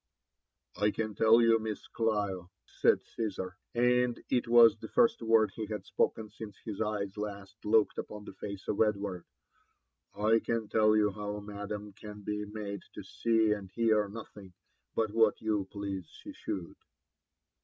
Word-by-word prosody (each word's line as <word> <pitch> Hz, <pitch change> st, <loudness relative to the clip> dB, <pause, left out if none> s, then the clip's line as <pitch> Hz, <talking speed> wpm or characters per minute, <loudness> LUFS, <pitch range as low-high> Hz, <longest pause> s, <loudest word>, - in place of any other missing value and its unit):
'' -, -, -43 dB
I 105 Hz, -, +5 dB
can 110 Hz, 0 st, -3 dB
tell 115 Hz, +2 st, +5 dB
you. 115 Hz, -1 st, +5 dB
Miss 110 Hz, -2 st, -5 dB
Clio," 100 Hz, -6 st, -1 dB, 0.2 s
said -, -, +2 dB
C»sar, 95 Hz, -5 st, -4 dB, 0.2 s
and 125 Hz, 0 st, +3 dB
it 125 Hz, -2 st, +2 dB
was 115 Hz, -2 st, +7 dB
the 110 Hz, -, -7 dB
first 235 Hz, -, +3 dB
word 110 Hz, -1 st, +4 dB
he 110 Hz, -2 st, -5 dB
had 105 Hz, -2 st, -5 dB
spoken 105 Hz, +2 st, 0 dB
since 105 Hz, -3 st, -9 dB
his 110 Hz, -2 st, -6 dB
eyes 105 Hz, -2 st, -2 dB
last 100 Hz, -1 st, -6 dB
looked 110 Hz, 0 st, +3 dB
upon 105 Hz, -1 st, -7 dB
the -, -, -9 dB
face 100 Hz, 0 st, -7 dB
of 105 Hz, -, 0 dB
Edward, 100 Hz, -4 st, 0 dB, 0.5 s
« -, -, -48 dB
I 110 Hz, +2 st, +3 dB
can 115 Hz, -2 st, -2 dB
tell 110 Hz, 0 st, +4 dB
you 105 Hz, -1 st, +3 dB
bow 105 Hz, +1 st, -5 dB
madam 105 Hz, 0 st, -6 dB
can 105 Hz, +1 st, -10 dB
be 105 Hz, +1 st, -3 dB
made 105 Hz, -1 st, -6 dB
to -, -, -7 dB
see 115 Hz, -2 st, +1 dB
atid 100 Hz, -2 st, -1 dB
hear 110 Hz, -3 st, +2 dB
nothing 100 Hz, -3 st, -10 dB, 0.4 s
but 110 Hz, -2 st, +1 dB
what 110 Hz, -1 st, +3 dB
you 105 Hz, -3 st, 0 dB
please 100 Hz, -4 st, -5 dB
she -, -, -11 dB
should." 90 Hz, -3 st, -5 dB
105 Hz, 165 wpm, -31 LUFS, 100-110 Hz, 0.5 s, was